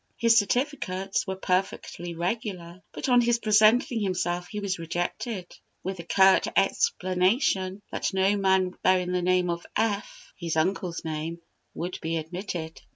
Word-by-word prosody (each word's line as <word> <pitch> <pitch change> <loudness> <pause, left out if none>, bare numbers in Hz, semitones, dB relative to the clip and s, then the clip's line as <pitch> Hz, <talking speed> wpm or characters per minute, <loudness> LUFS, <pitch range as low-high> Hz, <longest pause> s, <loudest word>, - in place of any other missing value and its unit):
His 230 -1 +4
certificates 205 -5 0
were 190 - -2
perfectly 180 -2 -2
regular; 180 -1 -4
but - - -4
on 245 -1 +5
his 240 0 +2
presenting 220 +2 +4
himself 180 -2 -1
he 210 - -5
was 200 -3 -2
rejected, 175 +4 -4 0.3
with 190 +1 -3
the 170 - -7
curt 190 +3 +4
explanation 190 - +1
that - - -1
no 190 +1 +2
man 190 -2 +2
bearing 185 -1 +2
the 180 0 0
name 180 0 +2
of 170 0 -4
F 210 -2 -2
(his 170 -3 -3
uncle's 175 +1 -1
name) 160 +2 -4 0.4
would 175 +2 -4
be 165 0 -1
admitted. 165 0 -5
185 Hz, 145 wpm, -27 LUFS, 175-205 Hz, 0.4 s, on